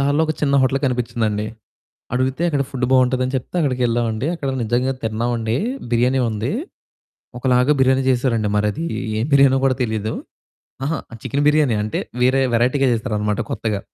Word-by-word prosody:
దారిలో 145 +3 +2
ఒక 155 - 0
చిన్న 140 -2 +1
హోటల్ 130 +1 +2
కనిపించిందండి. 115 -4 -1 0.7
అడుగితే 130 +4 0
అక్కడ 145 -3 +1
ఫుడ్డు 130 -2 -1
బావుంటదని 130 0 +2
చెప్తే 130 - -6
అక్కడికెళ్ళామండి. 120 -4 0
అక్కడ 145 -5 -4
నిజంగా 120 +4 0
తిన్నావండీ, 115 +1 -1 0.3
బిర్యానీ 125 +3 +2
ఉంది. 110 +4 -2 0.9
ఒకలాగా 125 +2 +3
బిర్యానీ 130 0 +3
చేసారండి. 120 -4 +1
మరదీ 105 +10 0 0.3
ఏం 110 - 0
బిర్యానో 140 -1 +6
గూడా 130 -1 +2
తెలీదు. 110 -1 -2 0.7
అహా! 160 +2 -1 0.2
చికెను 140 +2 -1
బిర్యానీయే 150 -7 +3
అంటే, 105 - -2 0.2
వేరే 130 +2 +4
వెరైటీగా 125 +4 +2
చేసారనమాట 105 -2 -1
కొత్తగా. 110 -2 -2
125 Hz, 140 wpm, -20 LUFS, 115-135 Hz, 0.9 s, బిర్యానో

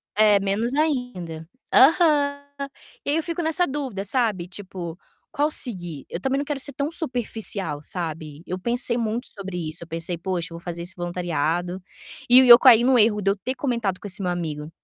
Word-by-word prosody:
é, 210 -1 +5
menos 210 +6 -1
ainda. 245 - -2 0.3
Aham. 285 -1 +4 0.6
E - - -1
aí 295 - +1
eu 325 - +1
fico 340 0 -3
nessa 325 +2 +1
dúvida 265 -8 -4
sabe 210 -5 0
tipo, 185 -3 -8 0.4
"Qual 295 +2 +1
seguir?". 175 - -2
Eu 170 - -5
também 265 +6 0
não 285 - -1
quero 285 -1 -3
ser 280 - -3
tão 280 +3 -2
superficial, 220 - -3
sabe. 155 -3 -5
Eu 185 - -4
pensei 235 +4 +4
muito 230 +1 -2
sobre 195 -3 -7
isso, 165 +2 -6
eu - - -21
pensei: 165 +2 -3
"Poxa 175 -1 -3
eu 165 - -7
vou 170 - -18
fazer 170 -1 -5
esse 175 +2 -6
voluntariado", 175 0 -2 0.5
e 250 +1 +9
eu 235 -1 +12
caí 240 -3 +7
no 255 0 +4
erro 210 -1 +3
de 195 0 +1
eu - - -6
ter 255 +6 -4
comentado 235 -9 -1
com - - -8
esse 200 +1 -3
meu 180 - 0
amigo, 155 -3 -5
205 Hz, 195 wpm, -23 LUFS, 175-255 Hz, 0.6 s, eu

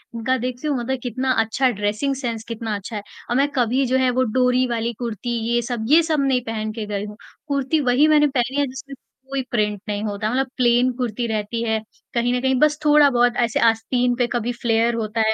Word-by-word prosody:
उनका 255 +3 0
देखते 250 +4 -4
हो 290 - +1
मतलब 255 +2 -2
कितना 255 +2 -1
अच्छा 250 +4 +1
ड्रेसिंग 210 +6 -1
सेंस 235 -4 -4
कितना 225 -2 -4
अच्छा 200 +3 -7
है। 205 - -3 0.3
ओर - - +1
मैं 280 +1 +3
कभी 255 +2 +2
जो 260 +1 +1
है 260 -1 +2
वो 255 +1 +1
डोरी 250 0 +3
वाली 235 0 -2
कुर्ती 235 -1 -4 0.2
ये 240 - +2
सब, 235 -2 -4
ये 325 +3 +7
सब 310 -2 0
नहीं 265 -2 +2
पहन 215 -1 -3
के 220 -2 -5
गई 205 0 -3
हूँ, 210 +1 -10 0.3
कुर्ती 280 +2 0
वही 255 +4 +3
मैंने 300 -1 +5
पहनी 265 +1 -1
है 285 - +3
जिसमें 270 +2 -9 0.3
कोई 275 -1 -1
प्रिंट 210 -3 0
नहीं 205 +1 -2
होता, 210 0 -2
मतलब 265 +1 0
प्लेन 245 +1 +3
कुर्ती 240 -1 -2
रहती 220 +1 -2
है 220 -1 0 0.3
कहीं 240 +1 +1
न 250 - +1
कहीं 265 0 +2
बस 300 0 +3
थोड़ा 295 -1 +6
बहुत 245 -1 +2
ऐसे 235 -2 +1
आस्तीन 245 +2 0
पे 245 -1 +1
कभी 240 0 -1
फ़्लेयर 230 0 +2
होता 225 0 -2
है 220 - +3
245 Hz, 225 wpm, -21 LUFS, 225-260 Hz, 0.3 s, ये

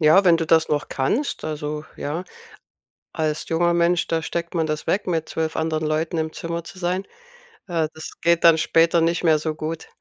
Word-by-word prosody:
Ja, 160 +6 +6
wenn 170 -2 +6
du 165 -1 -2
das 160 0 +4
noch 150 -1 -1
kannst, 215 - -1
also, 150 0 -4
ja. 160 +6 -4 0.9
Als 155 -1 -1
junger 170 +1 +2
Mensch, 175 +1 +2
da 165 -1 0
steckt 170 +2 -4
man 160 -2 +1
das 155 0 -3
weg, 205 - 0
mit 165 -3 -1
12 160 -1 -2
anderen 160 -1 -1
Leuten 155 +2 -1
im 160 0 -2
Zimmer 170 0 -4
zu 185 - -11
sein. 185 +2 -1 0.6
Äh, 165 -3 0
das 160 - -8
geht 170 0 +3
dann 165 -1 +7
später 165 +1 +3
nicht 170 +2 +1
mehr 155 -2 +4
so 155 0 -3
gut. 160 +1 -5
165 Hz, 200 wpm, -23 LUFS, 155-170 Hz, 0.9 s, dann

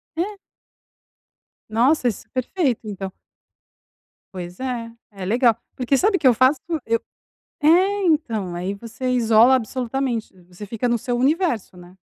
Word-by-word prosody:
É. 400 +5 -2 1.3
Nossa, 250 +4 +3
isso 225 - -3
é - - -44
perfeito, 265 - -1
então. 195 -2 -5 1.2
Pois 180 +1 -7
é, 245 -3 -4 0.2
é 195 -2 -7
legal. 235 +3 +3 0.2
Porque 260 +2 +1
sabe 395 +5 +3
o - - -9
eu 250 - +7
faço? 255 +4 +3 0.3
Eu 230 0 +1 0.6
é, 380 +6 +4
então, 225 - 0
aí 180 +3 -3
você 230 +5 -6
isola 235 +1 +5
absolutamente, 250 -1 -1
você 180 +3 -10
fica 230 +4 -2
no 235 - +2
seu 245 +2 -2
universo, 270 - 0
né. 175 +1 -14
240 Hz, 140 wpm, -22 LUFS, 215-270 Hz, 1.3 s, eu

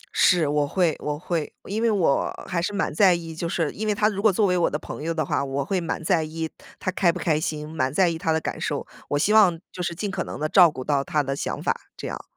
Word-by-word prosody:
是， 175 -5 +4
我 145 0 +1
会 170 0 +1
我 150 0 -3
会 165 -2 -3
因 210 +3 -3
为 230 - +3
我 185 -10 +2 0.2
还 175 -2 -1
是 180 - -1
蛮 200 -2 -1
在 185 +2 +5
意 165 -1 -6
就 165 +1 -3
是 165 -4 0
因 215 +1 -4
为 210 - +1
他 210 +1 +3
如 200 -2 -3
果 215 -1 +5
作 205 +3 +2
为 180 - +2
我 175 - +2
的 150 - -2
朋 150 - -8
友 165 +2 -2
的 160 -1 -1
话， - - 0
我 140 0 -2
会 185 +3 -1
蛮 165 - -3
在 165 -1 +2
意 160 +1 -4 0.3
他 185 - -1
开 185 -2 +3
不 - - -6
开 155 -3 +1
心， 150 -1 -3
蛮 140 -4 -1
在 180 +6 +3
意 165 - -3
他 160 -1 -1
的 160 - +2
感 - - -5
受。 - - -2 0.2
我 145 - +1
希 205 +8 +2
望 190 -6 +5
就 180 - -6
是 170 - -2
尽 200 +2 -3
可 190 -2 -2
能 - - -7
地 155 - 0
照 175 +1 +7
顾 130 -4 -7
到 140 0 +1
他 150 0 0
的 135 0 -2
想 - - -4
法， - - +1 0.2
这 - - -5
样。 - - -6
165 Hz, 305 characters per minute, -24 LUFS, 150-190 Hz, 0.3 s, 照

